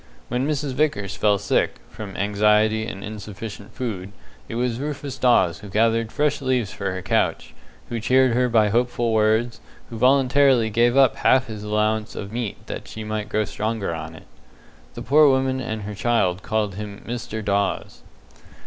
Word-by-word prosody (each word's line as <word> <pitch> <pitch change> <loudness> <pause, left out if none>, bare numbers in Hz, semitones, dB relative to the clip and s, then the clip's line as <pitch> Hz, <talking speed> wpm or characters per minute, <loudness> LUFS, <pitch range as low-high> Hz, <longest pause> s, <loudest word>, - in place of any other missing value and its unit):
When 125 +3 -1
Mrs. 145 -2 -1
Vickers 125 -9 -1
fell 105 -1 +2
sick, 100 0 0 0.2
from 100 -3 -8
anxiety 105 +2 +2
and 95 -2 -7
insufficient 105 0 -8
food, 100 -6 -4 0.4
it - - -5
was 120 0 -1
Rufus 145 -1 -4
Dawes 95 -8 +3
who 105 0 -10
gathered 115 +2 +1
fresh 150 -1 0
leaves 125 -6 0
for 100 -1 -3
her 95 0 -5
couch, - - 0 0.4
who 120 - -3
cheered 130 +3 +3
her 125 +1 +2
by 110 -3 +3
hopeful 120 +1 0
words, 110 +2 +2 0.3
who 115 - -6
voluntarily 130 -2 +4
gave 120 +4 +3
up 135 -3 +5
half 130 0 +3
his 110 -3 -7
own 105 - -6
allowance 110 +1 0
of 100 0 -6
meat 115 -4 -4
that - - -7
she 110 - -7
might 110 0 -4
grow 110 0 0
stronger 110 -5 -3
on 80 0 -7
it. - - -14 0.7
The - - -6
poor 150 +1 +6
woman 130 0 +1
and 110 -4 -4
her 105 +1 -5
child 100 -4 +1
called 110 -3 -1
him 105 +1 -8
"Mr." 115 -2 -5
Dawes. 100 0 -1
110 Hz, 175 wpm, -23 LUFS, 105-125 Hz, 0.7 s, poor